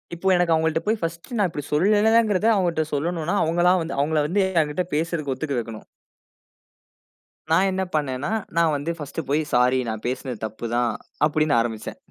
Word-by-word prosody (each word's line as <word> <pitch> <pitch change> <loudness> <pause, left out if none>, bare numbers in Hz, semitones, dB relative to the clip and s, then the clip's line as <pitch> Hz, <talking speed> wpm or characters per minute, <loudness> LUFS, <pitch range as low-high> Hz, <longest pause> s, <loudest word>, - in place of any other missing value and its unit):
இப்போ 180 +3 -4
எனக்கு 175 -2 +2
அவுங்கள்ட்ட 160 0 +1
போய் 215 +1 +1
ஃபர்ஸ்ட் 170 +5 -5
நான் 205 - +3
இப்பிடி 145 -3 -6
சொல்லலங்கிறத 210 +4 +3
அவுங்கட்ட 175 -5 +1
சொல்லணுன்னா, 165 +4 -1
அவுங்களா 175 +3 +3
வந்து 165 +1 -4
அவுங்கள 155 +2 +1
வந்து 195 +6 +1 0.2
எங்கிட்ட 150 +4 -1
பேசுறதுக்கு 160 -3 -1
ஒத்துக்க 140 0 -3
வைக்கணும். 115 -1 -7 1.7
நான் 185 +4 +4
என்ன 190 0 -1
பண்ணேனா, 140 +1 -1 0.3
நான் 165 -1 +3
வந்து 145 +4 -2
ஃபர்ஸ்ட் 150 -1 -7
போய் 145 +3 +1
"ஸாரி, 125 +1 +4
நான் 110 -1 -4
பேசுனது 125 -1 -3
தப்பு 110 +2 -7
தான்." 120 0 +2 0.4
அப்பிடின்னு 155 -1 +1
ஆரம்பிச்சேன். 115 -2 -3
160 Hz, 160 wpm, -23 LUFS, 140-175 Hz, 1.7 s, நான்